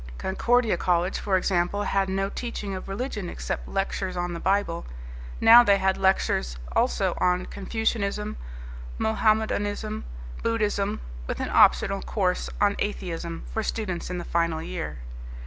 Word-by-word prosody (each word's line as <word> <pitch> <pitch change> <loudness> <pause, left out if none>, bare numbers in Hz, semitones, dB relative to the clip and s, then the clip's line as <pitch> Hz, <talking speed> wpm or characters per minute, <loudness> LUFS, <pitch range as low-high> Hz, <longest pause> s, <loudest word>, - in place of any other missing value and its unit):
Concordia 230 +1 +1
College, 175 +1 +1
for 195 -2 +1
example, 185 +2 0
had 195 -1 +1
no 195 +1 0
teaching 210 -2 -5
of 185 - -6
religion 205 -3 -3
except - - -4
lectures 195 -1 -2
on 175 0 -2
the 170 - -5
Bible. 190 -2 0 0.6
Now 235 +2 +9
they 200 -4 +4
had 190 0 +2
lectures 190 - +1 0.2
also 60 - +2
on 180 0 +2
Confucianism, 210 0 -2 0.6
Mohammedanism 215 -1 0 0.4
Buddhism, 210 - 0 0.3
with - - -3
an - - -2
optional 195 0 +4
course 185 -4 -1
on 205 -1 +3
atheism 170 -4 -3
for 220 - 0
students 205 -5 -3
in 180 - -3
the 175 - -5
final 170 -1 0
year. 165 - -5
195 Hz, 135 wpm, -26 LUFS, 180-210 Hz, 0.6 s, Now